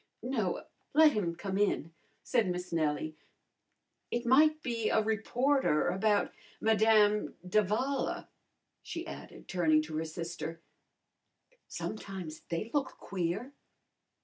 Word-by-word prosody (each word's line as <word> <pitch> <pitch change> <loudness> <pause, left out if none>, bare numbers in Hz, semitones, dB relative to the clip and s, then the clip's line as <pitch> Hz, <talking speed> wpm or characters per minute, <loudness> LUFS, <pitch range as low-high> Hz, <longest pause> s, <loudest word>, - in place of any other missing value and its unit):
"No, 230 -8 -1 0.3
let 310 0 +8
him 180 -9 -1
come 195 +2 -3
in," 165 -5 +1 0.3
said 230 -7 +2
Miss 180 0 -4
Nellie. 155 -1 0 0.9
"It 240 +1 -2
might 305 +5 +5
be 230 -3 -1
a - - +3
reporter 220 - +2
about 205 +3 +2 0.3
Madame 215 -1 +4
d'Avala," 215 +8 0 0.5
she 335 0 -5
added, - - -10
turning 160 -5 +3
to 155 0 -5
her 160 - -1
sister. 165 0 -5 1.1
"Sometimes 190 -7 -6
they 170 +7 -3
look 275 -3 -1
queer." 190 +8 -3
205 Hz, 110 wpm, -31 LUFS, 170-240 Hz, 1.1 s, let